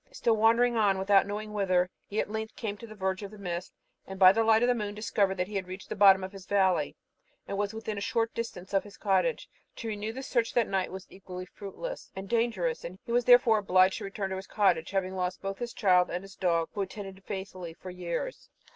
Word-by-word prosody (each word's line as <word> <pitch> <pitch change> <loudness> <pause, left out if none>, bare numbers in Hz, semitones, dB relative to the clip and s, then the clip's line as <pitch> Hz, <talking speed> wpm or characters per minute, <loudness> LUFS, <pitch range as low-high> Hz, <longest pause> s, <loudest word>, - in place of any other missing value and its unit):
Still 235 - +1
wandering 230 +2 +4
on 200 -3 +3
without 195 +1 +4
knowing 210 +1 -5
whither, 185 -3 +2 0.2
he 210 - -2
at - - -1
length 220 0 -4
came 210 -3 -4
to 230 - -10
the 215 - -11
verge 190 -1 -2
of 200 - -6
the 215 - -12
mist, 180 -2 -4 0.4
and, 190 - -7
by 185 -1 +9
the 225 +3 +2
light 225 +1 +4
of - - +4
the 250 - +4
moon, 210 -3 -4
discovered 205 -2 +1
that 180 -1 -1
he 210 - -10
had 190 -1 -4
reached 185 +1 -8
the - - -3
bottom 195 -2 +7
of 190 - -5
his 195 -2 -11
valley, 185 -7 +2 0.5
and 200 - -3
was 205 0 -1
within 220 -2 -4
a - - -7
short 225 +2 0
distance 195 -5 -6
of 195 - +3
his 205 -1 -13
cottage. 215 - +1 0.3
To 230 - -6
renew 210 +1 -3
the 265 +4 -7
search 235 -4 0
that 240 -3 +3
night 190 -2 -1
was 190 0 -7
equally 185 -1 -8
fruitless 215 - -7
and 190 +1 -6
dangerous. 240 - 0 0.2
He 235 - -6
was, 240 0 +2
therefore, 245 -3 +6
obliged 185 -1 +3
to - - -7
return 195 0 -4
to 190 - -2
his 190 - -8
cottage, 195 -6 +2
having 190 -1 -1
lost 180 -1 -2
both 195 0 -4
his 240 -1 -4
child 180 -3 +3
and 180 +2 -3
his 195 -1 -12
dog, 170 -3 +1
who - - -6
had 195 -1 -1
attended 195 -2 -8
him 190 - -20
faithfully 185 -4 -6
for 185 - -9
years. 180 - -5
200 Hz, 245 wpm, -29 LUFS, 190-220 Hz, 0.5 s, by